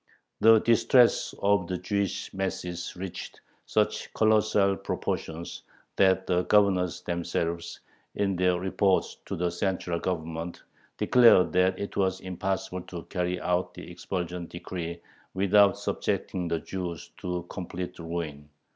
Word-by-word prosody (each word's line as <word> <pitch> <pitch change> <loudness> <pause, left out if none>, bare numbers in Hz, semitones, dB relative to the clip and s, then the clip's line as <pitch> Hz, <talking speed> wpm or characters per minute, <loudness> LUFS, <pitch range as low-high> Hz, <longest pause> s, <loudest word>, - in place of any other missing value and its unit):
The 115 0 +7
distress 120 +1 +4
of 100 -3 +3
the 90 - -2
Jewish 100 0 -2
masses 90 -2 -4
reached 95 0 -7 0.3
such - - 0
colossal 110 -2 +3
proportions 85 -2 -4 0.3
that 95 -1 +3
the 90 -1 +2
governors 95 -4 +3
themselves, 85 -1 -3 0.3
in 100 -2 0
their 90 0 +2
reports 95 +1 +1
to - - -3
the 90 0 0
central 90 -1 -1
Government, 85 -1 -4 0.3
declared 120 -7 +6
that 90 +1 +3
it 100 - -5
was 95 -1 +1
impossible 95 0 -3
to 85 -3 -7
carry 90 0 -2
out 90 +1 0
the - - -9
expulsion 90 -2 -4
decree 85 -1 -6 0.4
without 100 +1 +5
subjecting 90 -2 -2
the 85 -1 0
Jews 90 -3 -5
to 90 -1 -4
complete 90 -1 -6
ruin. 80 -4 -5
90 Hz, 125 wpm, -28 LUFS, 85-95 Hz, 0.4 s, The